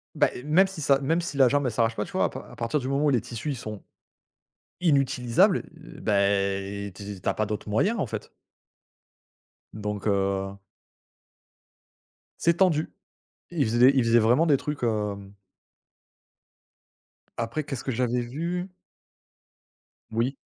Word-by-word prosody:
Bah, - - +4
eh, 125 - -8
même 155 +7 +4
si 190 -4 -8
ça 140 -1 +3
même 160 +5 +1
si 170 -4 -4
la 135 -2 +5
jambe 145 +1 +1
elle 125 - 0
s'arrache 115 0 +1
pas, 105 - -2
tu - - -13
vois? - - +2
À - - 0
par - - -9
à - - -12
partir 115 +5 -1
du 130 - -5
moment 140 +2 +1
où - - +4
les 130 -4 +3
tissus, 120 +5 -6
ils 140 - -1
sont 105 -4 -7 1.0
inutilisables, 140 - +3
bah, 105 -11 0
eh, 100 0 -2
tu 100 0 -7
tu - - -8
as - - +3
pas 110 - -1
d'autres 105 0 -4
moyens 195 - +1
en - - +1
fait. 110 - -6 1.4
donc 105 -1 -4
heu, 100 -1 0 1.8
c'est 170 0 +3
tendu. 170 -5 +2 0.6
Ils 160 -5 +1
faisaient 120 +4 +5
ils 130 - +4
faisaient 115 0 +4
vraiment 120 +8 +4
des 145 -4 +4
trucs, 150 -1 -5
hem 105 -3 -2 2.0
Après, 115 +6 -2
qu'est 140 - -5
ce 120 - -7
que 135 - -2
j'avais 125 0 0
vu? 170 +9 -3 1.4
Oui. 120 +5 0
120 Hz, 160 wpm, -26 LUFS, 105-150 Hz, 2.0 s, la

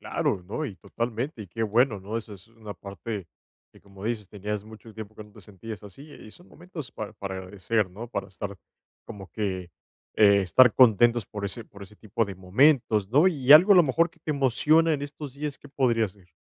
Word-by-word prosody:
Claro, 90 - -1
¿no?, 155 +10 -4
y 100 -9 -6
totalmente, 120 +1 -4
y 95 - -13
qué 115 +6 -4
bueno, 110 0 +2
¿no?, 100 +4 -5
eso 110 -2 -6
es 95 +1 -13
una 110 -2 -10
parte 100 +1 -7 0.5
que, - - -19
como 100 0 -13
dices, 110 -4 -3
tenías 105 0 -5
mucho 110 0 -14
tiempo 110 -1 -9
que 110 - -9
no 105 - -19
te - - -15
sentías 105 +1 -10
así, 105 +7 -12
y 110 - -13
son 175 - -16
momentos 165 -6 -10
para 110 -2 -6
para 95 -1 -6
agradecer, 95 +2 -2
¿no?, 110 +6 -8
para 100 -4 -5
estar, 100 +1 -7 0.5
como 95 -2 -10
que, 95 -5 -3 0.4
eh, 100 -2 +5
estar 120 +7 +5
contentos 120 -2 +4
por 105 -1 -6
ese 100 +3 -4
por 100 0 -14
ese 105 +2 -13
tipo 110 +1 -2
de 100 -1 -7
momentos, 110 +1 +2
¿no? 150 +8 +5
Y, 140 -7 -3
algo 180 +7 +9
a 195 - +6
lo 175 - +8
mejor, 165 +4 +2
que 165 0 -29
te 155 - -4
emociona 150 +4 +3
en 145 -1 -2
estos 145 -1 -8
días, 145 0 -5
¿qué 145 - -15
podría 120 -6 +1
ser? 90 -1 -21
110 Hz, 215 wpm, -26 LUFS, 100-130 Hz, 0.5 s, algo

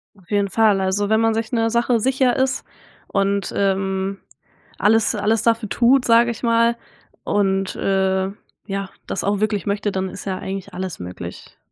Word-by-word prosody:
Auf 190 -4 -23
jeden 200 -1 +1
Fall, 215 -2 +3
also 190 +2 0
wenn 220 0 +3
man 225 0 +3
sich 220 0 -2
'ner 225 -2 +1
Sache 235 0 +2
sicher 260 +1 +2
ist 265 0 0 0.4
und, 200 0 0
ähm, 195 0 0 0.6
alles 225 +2 +3
alles 215 +1 +1
dafür 230 -2 +1
tut, 250 +3 +3
sag 230 0 +5
ich 235 0 -4
mal, 230 0 +3 0.5
und, 195 -1 0
äh, 190 -1 +1 0.4
ja, 195 -1 -3 0.2
das - - -3
auch 200 0 0
wirklich 210 -3 0
möchte, 205 +1 -1
dann 190 0 -2
ist 195 0 -9
ja 190 -2 -2
eigentlich 190 0 -6
alles 185 -1 -5
möglich. 90 0 -9
205 Hz, 170 wpm, -21 LUFS, 195-230 Hz, 0.6 s, sag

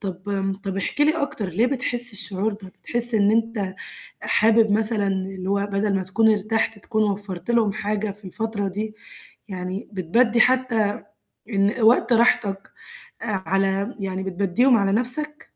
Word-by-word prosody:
طب 190 -3 -6
آمم، 195 -1 -1
طَب 195 -1 -6
احكِ 200 - -3
لي 305 +1 +3
أكتر 220 -8 -3
ليه 210 +8 +1
بتحس 245 -2 +2
الشعور 205 0 -1
ده؟ 200 -2 -10
بتحس 240 0 +3
إن 205 -1 +3
أنت 220 -4 -1 0.5
حابب 220 0 +3
مثلًا 215 -1 +1
اللي 190 -1 -3
هو 200 0 0
بدل 200 0 0
ما 190 - -1
تكون 220 +4 +2
ارتحت 215 +1 -1
تكون 215 +1 -1
وفَّرت 200 +1 -5
لهُم 220 -4 +2
حاجة 210 0 -2
في 205 +1 -9
الفترة 205 +1 -3
دي، 215 +3 -5 0.5
يعني 185 +2 -6
بتبدِّي 230 +7 +2
حتى 245 -5 +2 0.6
إن 200 +2 0
وقت 230 +2 +4
راحتك 205 -4 +2 0.5
آآ 230 - -5 0.2
على 195 +5 0
يعني 190 -1 -3
بتبدِّيهم 200 +7 +2
على 200 -2 +1
نَفسك؟ 280 +7 -1
210 Hz, 155 wpm, -22 LUFS, 195-230 Hz, 0.6 s, وقت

